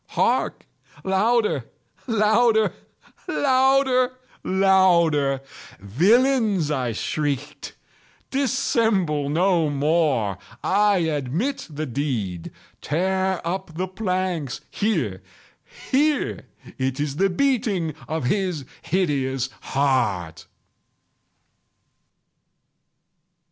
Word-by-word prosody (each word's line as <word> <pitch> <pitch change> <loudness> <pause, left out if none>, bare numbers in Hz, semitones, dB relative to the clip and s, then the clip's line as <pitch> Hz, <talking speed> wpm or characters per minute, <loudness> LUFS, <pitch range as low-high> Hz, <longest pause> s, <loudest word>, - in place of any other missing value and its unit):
—hark! - - +1 0.4
louder! 200 - +1 0.4
louder! 220 0 +3 0.5
louder! 260 -1 +3 0.3
louder! 170 -8 +3 0.4
"Villains!" 200 - +2
I 130 -5 -1
shrieked, 145 +4 -3 0.6
"dissemble 220 - +1
no 170 0 +2
more! 145 - +1 0.2
I 205 +1 +3
admit 160 - -2
the 155 0 -4
deed!—tear 145 - -2
up 175 -1 -4
the 185 +1 -1
planks!—here, 180 - -2 0.7
here!—It 260 - -1
is 145 -1 -2
the 195 +2 +3
beating 210 - 0
of 160 -2 -3
his 175 0 -1 0.2
hideous 140 -7 -1
heart!" 115 - -1
170 Hz, 65 wpm, -23 LUFS, 140-210 Hz, 0.7 s, louder